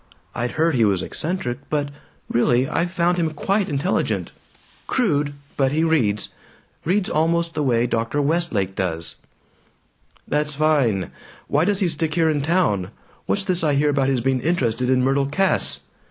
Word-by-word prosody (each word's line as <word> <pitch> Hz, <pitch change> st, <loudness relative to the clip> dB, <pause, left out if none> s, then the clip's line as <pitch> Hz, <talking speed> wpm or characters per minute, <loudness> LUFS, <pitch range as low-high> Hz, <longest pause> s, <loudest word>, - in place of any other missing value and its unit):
I'd 120 Hz, +1 st, -3 dB
heard 160 Hz, +1 st, +2 dB
he 120 Hz, -4 st, +3 dB
was 100 Hz, -4 st, +2 dB
eccentric, 155 Hz, -7 st, -2 dB
but 145 Hz, -2 st, -1 dB, 0.4 s
really, 120 Hz, +2 st, +2 dB
I 170 Hz, -, 0 dB
found 175 Hz, 0 st, 0 dB
him 165 Hz, -2 st, +1 dB
quite 195 Hz, +5 st, 0 dB
intelligent. 145 Hz, +5 st, -1 dB, 0.6 s
Crude, 150 Hz, -, +1 dB, 0.2 s
but 135 Hz, -1 st, +2 dB
he 155 Hz, +2 st, +1 dB
reads 120 Hz, -11 st, +1 dB, 0.5 s
reads 185 Hz, +4 st, +1 dB
almost 165 Hz, +1 st, +1 dB
the 155 Hz, -, -2 dB
way 120 Hz, -4 st, +2 dB
Dr. 115 Hz, +4 st, -1 dB
Westlake 140 Hz, -, 0 dB
does." 85 Hz, -3 st, -2 dB, 1.1 s
"That's 150 Hz, 0 st, 0 dB
fine. 140 Hz, -, +1 dB, 0.4 s
Why 150 Hz, +4 st, +2 dB
does 205 Hz, 0 st, 0 dB
he 185 Hz, -, +3 dB
stick 160 Hz, -1 st, -1 dB
here 165 Hz, -2 st, +3 dB
in 145 Hz, -2 st, -1 dB
town? 140 Hz, -, +1 dB, 0.4 s
What's 200 Hz, -, 0 dB
this 185 Hz, -3 st, +1 dB
I 150 Hz, -3 st, +2 dB
hear 145 Hz, +1 st, +2 dB
about 135 Hz, -1 st, +1 dB
his 130 Hz, -3 st, +1 dB
being 130 Hz, 0 st, 0 dB
interested 125 Hz, -7 st, 0 dB
in 130 Hz, -1 st, +3 dB
Myrtle 135 Hz, +1 st, +2 dB
Cass?" 190 Hz, +7 st, +2 dB
145 Hz, 160 wpm, -22 LUFS, 125-170 Hz, 1.1 s, he